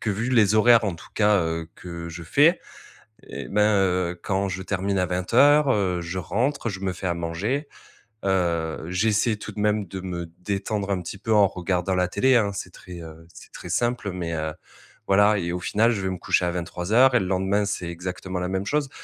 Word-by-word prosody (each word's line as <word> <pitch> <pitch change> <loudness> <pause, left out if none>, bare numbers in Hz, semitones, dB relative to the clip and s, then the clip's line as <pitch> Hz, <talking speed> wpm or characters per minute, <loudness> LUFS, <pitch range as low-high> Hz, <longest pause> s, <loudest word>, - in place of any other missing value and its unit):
que 110 - -1
vu 115 +6 -2
les 110 -4 +4
horaires 115 +1 +6
en 95 - -1
tout 80 - -13
cas, 105 -2 +3
heu, 80 0 -3
que 85 -2 -8
je 85 0 -8
fais 150 - +4 0.6
et 70 -2 -8
ben, 105 - 0 0.2
heu, 90 -2 0
quand 95 0 -1
je 95 0 -4
termine 100 +1 -1
à 90 - +2
20:00, 135 +11 +4
heu, 95 -6 +1
je 85 +2 -5
rentre, 120 +7 -1
je 95 -1 -7
me 95 -1 -1
fais 95 +1 -6
à 85 - 0
manger. 95 - -2 0.6
Heu, 85 -5 0
j'essaie 105 +4 +1
tout 105 - -8
de 105 - -8
même 105 -1 +1
de 95 +2 -7
me 90 -2 -5
détendre 100 +1 -3
un 95 -2 0
petit 95 - -7
peu 110 +3 -4
en 105 -2 +6
regardant 90 0 -2
la 90 0 +2
télé, 130 +7 +3
hein, 105 -3 +1
c'est 90 -2 -6
très 90 -1 -11
heu, 80 0 -12
c'est - - -14
très 90 - -9
simple, 120 +1 -1
mais, 85 -2 -4
heu. 80 -1 -3 0.5
Voilà 105 +2 +4
et 85 -2 -2
au 90 - -3
final, 115 +6 +2
je 105 - -2
vais 95 - -1
me 90 - -3
coucher 90 - +1
à 90 - 0
23:00 90 +9 +2
et 125 - +5
le 95 - -2
lendemain, 95 +2 +1
c'est 95 -4 -3
exactement 90 +1 -5
la 90 - -2
même 95 +1 -2
chose. 145 +4 0
95 Hz, 215 wpm, -24 LUFS, 90-105 Hz, 0.6 s, horaires